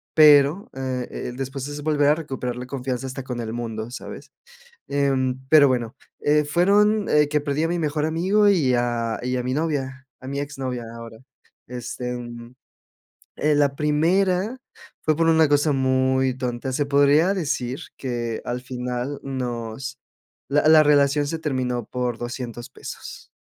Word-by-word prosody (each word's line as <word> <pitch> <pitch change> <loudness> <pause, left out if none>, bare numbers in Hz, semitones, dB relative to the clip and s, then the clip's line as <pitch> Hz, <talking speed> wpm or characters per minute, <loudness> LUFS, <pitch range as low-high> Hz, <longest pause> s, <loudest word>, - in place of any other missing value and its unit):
pero, 150 - +6
eh, 130 -2 -3 0.2
el 125 - -9
después 135 0 -4
es 145 0 -6
volver 150 -2 +2
a 150 - +5
recuperar 130 -6 -4
la 125 - -6
confianza 130 -1 -3
hasta 130 0 -6
con 125 -2 -5
el 115 -1 -4
mundo, 115 -1 -4
¿sabes? - - -9 0.6
Em, 135 -2 +1
pero, 150 -3 +7
bueno, 120 -3 -1 0.2
eh, 150 +1 +3
fueron, 205 +6 +3
eh, 150 -1 +4
que 150 - +2
perdí 145 +1 -1
a 165 - +2
mi 175 0 -1
mejor 150 -1 0
amigo 190 +6 +2
y 150 -10 +3
a 120 -2 0
y 125 +1 -2
a 125 - -2
mi 125 - -1
novia, 135 -4 -2 0.2
a 130 - -9
mi 140 +1 -3
exnovia 130 -4 -4
ahora. 115 -1 -10 0.5
Este, 125 0 -5
mm, 120 0 -8 0.8
eh, 150 0 +2
la 140 -1 +2
primera 180 - +1 0.5
fue 155 -1 +2
por 165 - +2
una 160 -2 +5
cosa 145 +1 +3
muy 130 0 +2
tonta, 125 0 -3
se 145 +2 0
podría 145 +6 +4
decir 140 -7 -2 0.2
que 120 -3 -3
al 125 +1 -3
final 125 +2 -4
nos 130 0 -4 0.5
la 145 +2 +3
la 155 -1 +8
relación 145 0 +3
se 165 - -3
terminó 125 -5 -2
por 125 -2 -3
$200 120 -1 -6
pesos, - - -10
135 Hz, 160 wpm, -23 LUFS, 125-150 Hz, 0.8 s, la